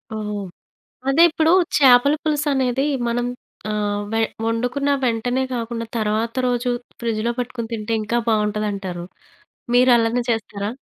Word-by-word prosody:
ఓహ్! 210 -1 -4 0.7
అదే 315 +5 +5
ఇప్పుడు 320 0 +2 0.3
చేపల 265 0 +6
పులుసనేది 280 -3 +1 0.2
మనం 240 +1 0 0.4
ఆహ్, 205 -1 -1
వే 225 - 0 0.3
వండుకున్న 245 +5 -1 0.2
వెంటనే 245 +2 0
గాకుండా 230 -1 -3
తర్వాత 220 +1 0
రోజు 245 0 0 0.3
ఫ్రిడ్జ్‌లో 230 0 -1
పెట్టుకొని 235 -2 -4
తింటే 220 0 -3
ఇంకా 215 +3 -1
బావుంటదంటారు. 210 -4 -1 0.7
మీరు 250 +1 +5
అలానే 230 +1 +1
చేస్తారా? 210 -2 -3
230 Hz, 115 wpm, -21 LUFS, 215-250 Hz, 0.7 s, చేపల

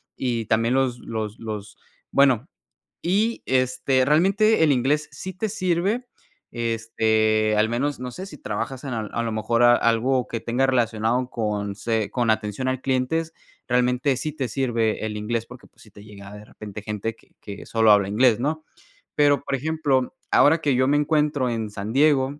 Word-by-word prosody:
y 120 -3 -2
también 115 +3 +1
los 130 -2 +1
los 110 -2 -5
los 105 -2 -7 0.3
Bueno, 135 -2 +3 0.5
y 210 +6 0
este, 130 0 +1
realmente 190 +6 +3
el 155 - +4
inglés 140 +4 +1
sí 190 - -7
te 210 +4 -3
sirve, 195 +5 -1 0.4
este, 110 -2 +1
al 110 +1 +3
menos, 135 +4 -1
no 125 -1 -5
sé, 185 +10 -7
si - - -11
trabajas 130 -2 -5
en 135 -3 -4
al 110 -2 -4
a 120 - -1
lo 115 - -2
mejor 110 +2 +1
a 120 0 +7
algo 120 +3 +1
que 115 - -4
tenga 125 +4 0
relacionado 120 0 0
con 105 -4 -2
se 110 0 -2
con 120 -3 0
atención 110 +3 -1
al 130 0 -1
clientes, 135 +5 -1 0.3
realmente 125 +2 +1
sí 155 +2 -4
te 135 -4 -3
sirve 115 -5 -1
el 105 -1 -4
inglés, 115 +2 -2
porque 125 -1 -13
pues - - -25
sí 110 - -18
te 100 - -14
llega 100 -2 -12
de 105 0 -11
repente 105 -1 -9
gente 105 +1 -4
que - - -27
que 100 -1 -9
solo 110 -1 +3
habla 100 -2 +4
inglés, 115 +1 +3
¿no? 155 +4 -2 0.5
Pero, 145 -1 +3
por - - -4
ejemplo, 145 -2 -1 0.2
ahora 160 +3 +5
que 145 - +1
yo 130 +1 +2
me 145 - +3
encuentro 150 -3 +1
en 115 -2 -3
San 105 +2 -6
Diego 140 -1 +2
125 Hz, 180 wpm, -23 LUFS, 110-140 Hz, 0.5 s, a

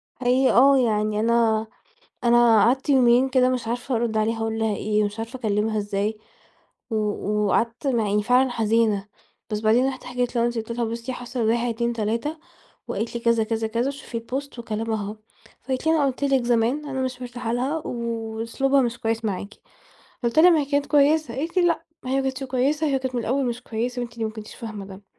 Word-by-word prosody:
حقيقي 255 +1 +2
آه 275 +3 +6
يعني 215 -4 +1
أنا 225 -1 +2 0.6
أنا 235 -2 +5
قعدت 260 +5 +1
يومين 255 -1 +5
كده 255 -1 +3
مش 250 -3 -2
عارفة 245 +2 -2
أرُد 230 -1 -1
عليها 225 +1 +1
أقول 225 0 -2
لها 220 -2 0
إيه 210 0 +1
مش 205 +2 -4
عارفة 230 +3 -5
أكلمها 215 -1 0
إزاي، 205 +1 -2 0.7
و 225 - -1 0.5
وقعدت 230 +6 0
مع 235 -5 +1
إني 210 0 +2
فعلًا 250 +3 +3
حزينة، 220 -3 +1 0.4
بس 210 0 -2
بعدين 230 +4 +3
رُحت 260 -1 -6
حكيت 245 0 -2
لمامتي 235 0 +1
قُلت 225 +1 -6
لها: 235 - +1
"بُصّي 230 +3 -4
حصل 245 0 -6
1، 235 +1 +1
2، 235 +1 -1
3 230 +8 -2 0.5
وقالت 220 +4 -3
لي 235 - -3
"كذا 230 -1 +3
كذا 225 0 -2
كذا" 235 +4 -1
وشوفي 275 -4 -5
الpost 260 +2 -6
وكلامها 220 -1 -3
أهو." 210 +2 -6 0.5
فقالت 260 +3 -3
لي: - - +5
"أنا 290 -3 +3
قُلت 270 +1 -2
لِك 270 -3 +2
زمان 240 +5 +1
أنا 265 -2 -3
مش 255 -1 -3
مرتاحة 240 -2 -4
لها، 265 +6 0
وأسلوبها 230 +3 -1
مش 240 -1 -2
كويس 225 -1 -1
معاكِ." 200 0 -3 0.7
فقُلت 235 +6 +2
لها: 355 +3 +8
"ما 325 -3 +4
هي 285 - 0
كانت 285 0 0
كويسة." 295 -3 +3
قالت 330 +6 -4
لي: 365 - +5
"لأ، 335 - 0 0.2
ما 255 - -4
هي - - +1
ما 270 - +2
كانتش 265 0 -3
كويسة 275 +4 0
هي 270 -2 +1
كانت 260 -1 -4
من 240 - 0
الأول 265 +4 0
مش 245 0 -3
كويسة 245 +2 -3
وأنتِ 235 -1 -6
اللي 230 -1 -2
ما 220 - -3
كنتيش 215 -1 -10
فاهمة 215 -4 -7
ده." 195 +1 -12
235 Hz, 205 wpm, -24 LUFS, 220-260 Hz, 0.7 s, لها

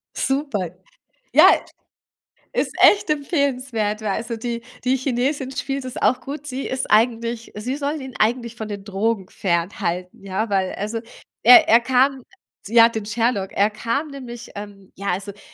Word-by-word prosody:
Super. 270 - -1 0.6
Ja, - - +8 1.0
ist - - -1
echt 405 - +6
empfehlenswert, 260 - -1
weil 215 - -2
also, 230 +3 -3
die 235 +1 -4 0.2
die 260 +1 +2
Chinesin 260 +1 -1
spielt 270 0 -3
das 255 - -7
auch 255 - +2
gut. 290 +1 -7
Sie 265 0 -4
ist 260 - -3
eigentlich 230 +1 +1
sie 250 +7 -3
soll 290 +1 -2
ihn 265 -3 -9
eigentlich 235 +1 +1
von 220 -1 -6
den 200 -2 -6
Drogen 200 0 -1
fernhalten, 180 0 -2
ja, 200 +3 -2
weil 190 -2 0
also, 215 +3 -3 0.4
er 330 -3 +8
er 230 - +7
kam 260 +1 +2 0.4
ja 230 +1 +6
den 220 -2 -5
Sherlock, 220 -2 0
er 205 +2 +3
kam 235 +8 -2
nämlich 240 -4 -9
ähm, 200 -2 -10
ja, 200 +1 -6
also 200 +2 -5
d 205 - -20
235 Hz, 160 wpm, -22 LUFS, 205-265 Hz, 1.0 s, Ja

